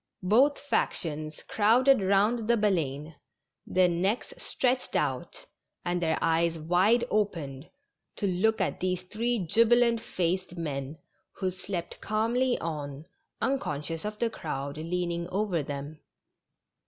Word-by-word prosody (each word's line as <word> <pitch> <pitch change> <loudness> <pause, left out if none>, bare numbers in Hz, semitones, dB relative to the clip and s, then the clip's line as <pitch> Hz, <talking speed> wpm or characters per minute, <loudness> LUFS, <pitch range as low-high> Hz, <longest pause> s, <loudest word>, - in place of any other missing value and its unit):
Both 255 +10 +4
factions 155 - -2
crowded 240 +4 +4
round 205 +4 +2
the 235 - +4
Baleine^ 165 - 0 0.5
their 185 0 +4
necks 190 - -1
stretched 255 - -1
out - - -2 0.4
and 175 0 0
their 160 -2 +1
eyes 165 0 +2
wide 180 +9 +3
opened 165 -9 -1 0.5
to - - -2
look 200 +4 +2
at - - -1
these 185 -1 -1
three 220 +2 -1
jubilant 230 +4 +4
faced 180 -2 -2
men, 145 -2 -4 0.4
who 185 -1 -2
slept 185 -1 -6
calmly 235 +4 +1
on, 150 -2 -5 0.4
unconscious 165 - -2
of 210 0 -4
the 230 +1 0
crowd 140 -6 -5
leaning 170 +1 -2
over 190 -3 0
them. 145 +2 -6
185 Hz, 120 wpm, -28 LUFS, 160-220 Hz, 0.5 s, Both